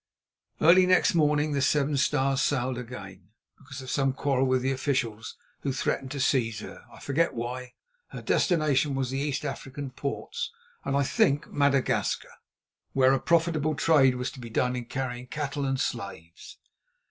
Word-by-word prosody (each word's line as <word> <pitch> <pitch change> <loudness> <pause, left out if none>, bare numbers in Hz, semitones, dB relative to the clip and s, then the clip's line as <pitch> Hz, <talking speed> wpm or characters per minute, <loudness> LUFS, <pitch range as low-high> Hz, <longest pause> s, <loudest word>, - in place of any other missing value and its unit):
Early 180 +3 +6
next 185 +2 +4
morning 150 -2 +2
the 140 -1 0
Seven 145 +1 +2
Stars 135 -1 +1
sailed 130 -3 0
again, 100 -6 -9 0.3
because 135 -1 -9
of 130 - -6
some 135 -2 +1
quarrel 135 -1 +1
with 130 -1 +1
the 135 - +1
officials, 130 -5 -2 0.2
who 140 - -2
threatened 135 0 -2
to 140 +1 -5
seize 115 -5 +1
her—I - - -12
forget 165 +5 0
why. 125 +2 -5 0.3
Her - - -9
destination 150 -5 +2
was 130 -2 -1
the 135 - -2
East 140 0 -2
African 140 0 -5
ports 450 - -4 0.3
and, 140 - 0
I 140 - +3
think, 140 +2 +1
Madagascar, 140 -2 +1 0.6
where 130 0 +4
a 135 - +2
profitable 160 -1 +1
trade 145 -5 +4
was 125 +1 -3
to - - -12
be 120 -2 -8
done 125 +2 0
in 125 -1 -4
carrying 125 0 -4
cattle 145 0 -3
and 135 -1 -1
slaves. 100 - -5
135 Hz, 160 wpm, -27 LUFS, 125-145 Hz, 0.6 s, Early